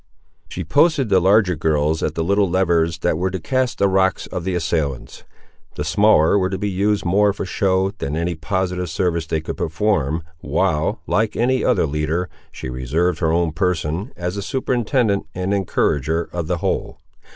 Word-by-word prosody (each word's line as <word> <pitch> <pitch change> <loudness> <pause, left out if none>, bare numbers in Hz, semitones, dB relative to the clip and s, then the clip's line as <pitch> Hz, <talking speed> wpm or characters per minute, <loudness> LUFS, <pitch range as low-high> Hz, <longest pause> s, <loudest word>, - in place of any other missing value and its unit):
She 90 - -5
posted 135 - +2
the 95 -2 +5
larger 95 0 +3
girls 80 0 0
at 75 - -2
the 80 - -1
little 100 +2 +2
levers 85 -3 +1
that 80 - 0
were 95 +1 0
to 95 0 -4
cast 130 +8 -1
the 100 - +3
rocks 95 -1 +1
on 90 - -3
the 95 -1 -1
assailants, 80 -6 -3 0.5
the 75 - -3
smaller 100 +2 +4
were 95 -1 0
to 95 - -3
be 105 +1 -2
used 100 +2 0
more 100 +3 +3
for 100 - -5
show 95 +1 +1
than 75 -8 -4
any 85 +2 -1
positive 90 +1 -2
service 85 -1 -1
they 80 0 -1
could 80 - -6
perform, 80 -3 0 0.2
while, 80 +7 0
like 110 0 0
any 130 +3 +1
other 115 -9 +2
leader, 75 +4 -2 0.2
she - - -7
reserved 70 +8 -1
her 80 -2 +1
own 85 -1 +1
person, 90 - -1
as 90 +2 -3
a - - -2
superintendent 120 -2 0
and 90 +2 -1
encourager 80 -4 0
of 85 -3 -3
the 90 0 0
whole. - - -2
90 Hz, 180 wpm, -20 LUFS, 80-100 Hz, 0.5 s, the